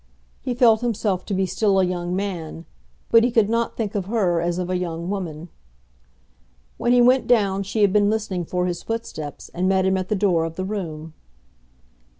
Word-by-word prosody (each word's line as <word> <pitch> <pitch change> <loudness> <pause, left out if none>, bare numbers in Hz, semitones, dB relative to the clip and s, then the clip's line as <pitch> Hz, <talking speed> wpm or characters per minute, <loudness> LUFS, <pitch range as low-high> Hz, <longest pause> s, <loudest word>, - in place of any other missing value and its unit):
He 250 -2 -3
felt 230 -3 +5
himself 210 -5 -1
to 205 - -2
be 190 0 +1
still 195 0 +1
a 190 - +4
young 180 0 -2
man, 170 -4 -4 0.5
but 230 0 +7
he 245 - +3
could 225 -3 +2
not 230 0 -1
think 215 -3 -2
of 200 -3 -2
her 190 -6 +1
as 170 0 -1
of 180 -1 -2
a 185 - -1
young 170 0 -3
woman. 175 -4 -5 1.3
When 240 - +1
he 245 0 +5
went 255 +2 +4
down 200 -5 +2
she 200 +2 -1
had 195 -2 +3
been 205 -1 +4
listening 205 -5 -2
for 180 +2 -1
his 175 -1 -3
footsteps, 190 -10 -6
and 185 +2 0
met 190 -1 +2
him 190 0 +2
at 185 0 -4
the 215 - +1
door 185 -5 +2
of 165 0 -4
the 185 +1 -3
room. 165 -6 -5
190 Hz, 200 wpm, -22 LUFS, 175-215 Hz, 1.3 s, but